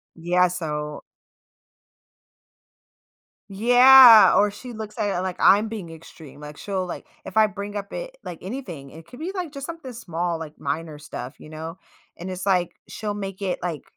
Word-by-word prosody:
Yeah, 180 +2 +2
so 150 -4 -5 2.5
Yeah, 245 +2 +8
or 205 +1 +4
she 250 +5 -10
looks 220 +1 -8
at 205 -4 -1
it - - -1
like 185 -1 -3
I'm 205 +3 +5
being 210 -6 -7
extreme, 160 -3 -13
like 150 0 -10
she'll 190 -2 -3
like 180 - -7 0.2
if - - -9
I 215 0 +6
bring 205 0 -7
up 200 -1 -5
it - - -7
like, 170 - -8
anything, 185 - -7
it 160 +1 -13
could 245 - -13
be 340 +4 -4
like 355 -5 -4
just 280 -1 -7
something 330 -5 -8
small 175 -7 -3
like 155 -1 -9
minor 155 +1 -4
stuff, 130 -3 -8
you - - -13
know, 160 +2 -8 0.4
and 180 +2 -7
it's 185 +1 -6
like 180 -3 +1
she'll 210 -2 -5
make 195 -1 -6
it 190 -2 -2
like 170 -5 -4
185 Hz, 175 wpm, -23 LUFS, 165-220 Hz, 2.5 s, Yeah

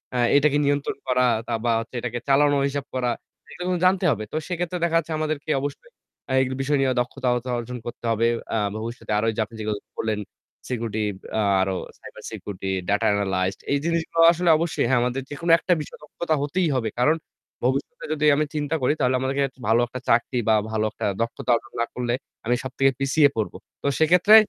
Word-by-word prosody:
আ - - +1 0.2
এটাকে 145 0 +4
নিয়ন্ত্রণ 145 0 0
করা 125 0 +3 0.2
তা 120 - -2
বা 120 - +3
হচ্ছে 115 +2 -8
এটাকে 120 0 -3
চালানো 145 +1 +4
হিসাব 140 0 -3
করা 125 -1 +1 0.4
এগুলো 180 - -7
কিন্তু 180 -1 0
জানতে 185 0 +3
হবে। 110 -4 -2
তো - - -6
সেক্ষেত্রে 175 0 -2
দেখা 165 -1 +1
যাচ্ছে 165 -1 -1
আমাদেরকে 155 -1 -2
অবশ্যই 145 - -6 0.4
আ - - -1
এগ 130 - +1
বিষয় 145 +2 +1
নিয়ে 130 - +2
দক্ষতা 125 0 -1
অর্জন 125 +1 -6
করতে 120 - -7
হবে। 115 +1 +2 0.3
আ - - +2 0.3
ভবিষ্যতে 115 -1 -6
আরো 110 - +1
ওইযে 110 0 -1
আপনি 115 - -15
যেগুলো 105 -1 -2 0.2
বললেন 110 -1 -1 0.5
সিকিউরিটি 110 -3 -2 0.6
আরো 95 0 0 0.2
সাইবার - - -12
সিকিউরিটি, 95 -1 -5 0.2
ডাটা 105 +1 +2
এনালাইজড 95 -2 0
এই - - +3
জিনিসগুলো 165 0 +1
আসলে 175 +1 +1
অবশ্যই, 160 -6 0
হ্যাঁ, 130 -2 +4
আমাদের 125 +2 -1
যেকোনো 165 +3 -1
একটা 180 - +2
বিষয় 150 - -9
দক্ষতা 155 +1 -2
হতেই 170 +5 0
হবে। 115 -3 0
কারণ 150 +6 +4 0.5
ভবিষ্যতে 135 - -1
যদি 150 0 0
আমি 150 +1 +1
চিন্তা 150 +1 -1
করি 130 +3 +3
তাহলে 130 0 +2
আমাদেরকে 135 0 0
ভালো 115 +2 +4
একটা 125 +2 -6
চাকরি 120 +2 +2
বা 110 - +6 0.2
ভালো 110 -1 0
একটা - - -5 0.2
দক্ষতা 115 +2 -1
অর্জন 135 +3 -6
না 120 - +2
করলে 120 -1 -1 0.3
আমি 120 - +2
সব 130 - -5
থেকে 135 0 +5
পিছিয়ে 140 +2 +4
পড়ব। 110 -2 -2 0.3
তো - - -2
সেক্ষেত্রে 180 +7 +6
130 Hz, 195 wpm, -24 LUFS, 115-150 Hz, 0.6 s, বা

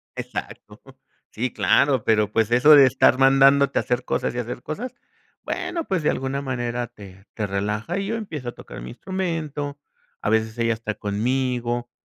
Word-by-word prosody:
Exacto. - - -7 0.5
Sí, 125 +2 -2
claro, 135 -5 +3
pero 105 -2 +2
pues 110 +1 +1
eso 145 +5 +7
de 140 -2 +8
estar 130 0 +4
mandándote 135 +1 +5
a - - +1
hacer 125 0 -2
cosas - - -1
y - - -4
hacer 125 0 -4
cosas, 240 +11 -5 0.5
bueno, 355 -2 -3
pues 185 -5 -1
de - - +3
alguna 135 +1 -3
manera 120 -2 -3
te 100 -1 -14
te 105 -2 -3
relaja 105 - -2
y 195 0 -2
yo 225 - -1
empiezo 155 - -5
a - - -5
tocar - - -11
mi 60 - -8
instrumento. 155 -6 -4 0.4
A 105 - -1
veces 110 +1 0
ella 115 0 +2
está 110 -1 -4
conmigo, 120 +3 -1
125 Hz, 175 wpm, -23 LUFS, 110-145 Hz, 0.5 s, de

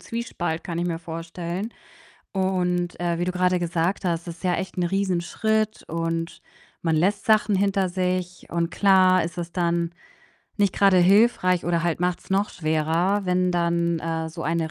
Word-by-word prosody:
Zwiespalt, 190 -8 -4
kann 170 -1 -4
ich 175 - -1
mir 165 -1 -2
vorstellen. 170 +5 -5 0.6
Und, 180 -2 0
äh, 170 -1 0
wie 175 - 0
du 180 - -1
grade 180 0 +2
gesagt 175 +3 -1
hast, 170 0 -1
das 170 -1 -6
ist 170 - -19
ja 180 -1 +2
echt 190 +2 -4
'n 180 - +1
Riesenschritt 200 +3 0
und 165 0 -3 0.4
man 165 -2 +1
lässt 195 +5 +1
Sachen 215 -1 +4
hinter 195 -1 +1
sich, 180 0 -2
und 170 0 -1
klar, 185 -2 +4
ist 170 +3 -6
es 170 0 -5
dann 170 -1 0 0.7
nicht 200 -3 +2
grade 195 -2 +4
hilfreich 185 -1 +4
oder 170 -1 +1
halt 170 -1 -1
macht's 180 +1 -2
noch 195 +2 +2
schwerer, 165 +5 0
wenn 180 0 +2
dann, 170 -1 +1
äh, 160 0 -3
so 165 0 -7
eine 165 0 -1
175 Hz, 170 wpm, -24 LUFS, 170-190 Hz, 0.7 s, Sachen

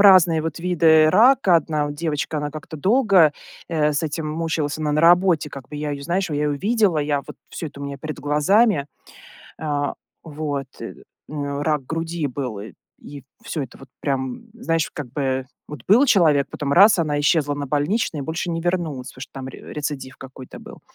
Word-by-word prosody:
разные 180 -5 +6
вот 165 -1 -4
виды 160 -3 +4
рака. 220 0 +5
Одна 155 -1 -1
от 145 - -5
девочка, 155 -1 -2
она 145 0 -3
как-то 155 +2 -8
долго, 195 - +4 0.4
э, 150 -3 +1
с 145 - -1
этим 155 0 -3
мучилась. 155 -1 -2
Она 150 -1 -1
на 150 - +2
работе, 175 -2 +4
как 135 -2 -10
бы 150 - -8
я 150 0 -3
ее, 140 0 -6
знаешь, 180 +3 -1
я 150 - -2
ее 145 -1 0
видела, 205 -3 +2
я 145 -1 0
вот - - -10
всё 165 - -6
это 140 - -13
у - - -5
меня 140 0 -5
перед 155 +1 -6
глазами. 150 +4 +3 0.7
А, 145 -2 -1 0.3
вот, 145 -3 -4
э, - - -7 0.3
у 155 - -9
нее 140 0 -3
рак 150 -4 0
груди 165 0 -3
был, 125 -6 -5
э, 110 - -9 0.3
и 140 -2 -11 0.2
всё 160 -10 -3
это 125 - -11
вот 135 - -13
прям, 130 -3 -2
знаешь, 165 -9 -1
как 145 -4 -6
бы 130 -2 -1 0.2
вот 150 -5 -9
был 240 +9 +6
человек, 155 - +4
потом 140 -1 -2
раз- 200 +1 +7
она 150 -3 0
исчезла 145 -1 +2
на 145 -1 -4
больничный 150 - 0
и - - -5
больше 160 +3 -3
не 165 0 -2
вернулась, 170 -7 -2
потому 130 - -13
что - - -8
там 135 -1 -7
ре 130 - -10
рецидив 140 -3 -5
какой-то 130 -1 -11
был. - - -12
150 Hz, 200 wpm, -22 LUFS, 145-170 Hz, 0.7 s, раз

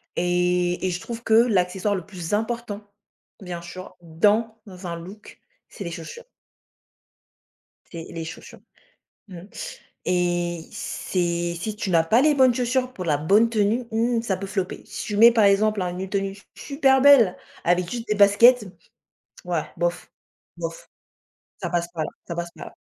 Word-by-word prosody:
Et 180 0 +1
et - - +1
je 175 0 -3
trouve 235 +4 -7
que 220 - 0
l'accessoire 200 -4 +2
le 180 -4 -5
plus 180 -2 -6
important, 220 -1 -2 0.6
bien 180 -2 -6
sûr, 185 +2 -10
dans 205 +7 +1 0.3
un 170 -1 -3
look, 190 +5 -11 0.3
c'est - - -8
les 170 - -5
chaussures 170 - -9 1.7
c'est 165 -2 -7
les 165 -1 -6
chaussures. 165 - -10 0.7
Mmh. 180 -3 -9 0.7
Et 175 -1 0
c'est 170 -1 -2
si 215 +3 -4
tu 210 -3 -3
n'as 165 -2 +4
pas 225 +10 +4
les 305 0 +4
bonnes 260 -3 +5
chaussures 255 +1 0
pour 185 - -6
la 150 -4 +1
bonne 205 +10 +3
tenue, 220 +2 +1
mmh, 230 +1 +1
ça 200 -5 -1
peut 195 - -5
flopper. 190 -2 -3
Si - - -6
tu 210 - -3
mets, 230 +2 +9
par 225 -2 +4
exemple, 205 +1 +3
un 180 0 -3
une 190 +1 -4
tenue 195 -1 -1
s 195 0 -15
super 270 -2 +2
belle 265 -10 +7 0.3
avec 175 0 +1
juste 235 -1 -5
des 210 - +1
baskets, 210 +4 +6 0.8
ouais, 175 -3 -1
bof, 175 0 -2 0.5
bof, 165 -1 -6 0.7
ça - - -2
passe 175 -1 0
pas 160 - -2
là, - - -5 0.2
ça 170 - -5
passe 170 0 -4
pas - - -8
là. - - -13
195 Hz, 170 wpm, -24 LUFS, 175-225 Hz, 1.7 s, mets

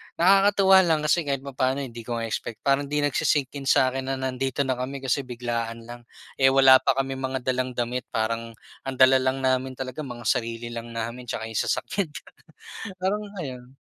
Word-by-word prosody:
nakakatuwa 195 +1 +5
lang 155 -2 +2
kasi 150 0 +1
kahit 135 -1 -1
papaano, 135 0 -1
hindi 120 -2 -8
ko 120 +1 -4
nga 115 - -3
expect, 115 0 -5
parang 140 0 +2
hindi 145 0 0
nagsisink-in 140 -1 0
sa 130 0 +4
akin 130 0 -4
na 135 - -1
nandito 130 +1 -2
na 130 -2 -2
kami 135 +1 -5
kasi 130 +2 +1
biglaan 115 -1 -4
lang. 120 0 -11 0.3
Eh, 135 - +6
wala 135 -1 +7
pa 130 - +1
kaming 135 -1 -2
dalang 130 -1 -1
damit, 120 +1 -2
parang 115 +1 -2 0.3
ang 135 - -3
dala 130 +1 +6
lang 130 +1 -1
namin 130 0 0
talaga 130 +2 -6
mga 120 -5 -6
sarili 115 0 -1
lang 115 0 -7
namin 115 +2 -5
tsaka 110 - -4
’yung 110 -1 -3
sasakyan, 195 -4 -1 0.9
parang 205 +3 0 0.2
ayun. 130 -2 -8
130 Hz, 180 wpm, -25 LUFS, 120-135 Hz, 0.9 s, wala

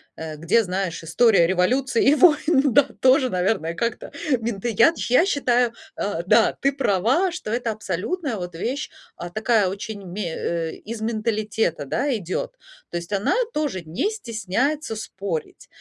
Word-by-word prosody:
э, 160 -1 -6
где, 175 +10 +2
знаешь, 185 -3 -3
история 175 +2 +4
революции 235 +8 +1
и 290 - +5
войн 300 -5 +4
да 285 - +7 0.2
тоже, 260 0 +5
наверное, 180 -3 0
как-то 230 +6 -3 0.3
мента 225 -2 -3
Я 230 +7 +5
ты - - -9
я 255 +8 +5
считаю, 245 - +1 0.2
э 200 -5 -2
да, - - +5
ты 275 - +3
права, 265 - +1
что 340 -11 -6
это 235 0 -1
абсолютная 220 - -3
вот 180 -3 -6
вещь, 255 - -3 0.2
а 175 - -7
такая 215 0 +2
очень 200 +1 -6
ме 180 -2 -4
э, 165 -1 -2
из 220 +1 -8
менталитета, 215 -6 -1
да, 265 - 0
идет. 185 -4 -3 0.4
То - - -2
есть 170 +3 -7
она 200 0 +1 0.2
тоже 290 -11 -2
не 175 - -2
стесняется 240 - -2
спорить. 195 -6 -5
220 Hz, 155 wpm, -23 LUFS, 185-260 Hz, 0.4 s, да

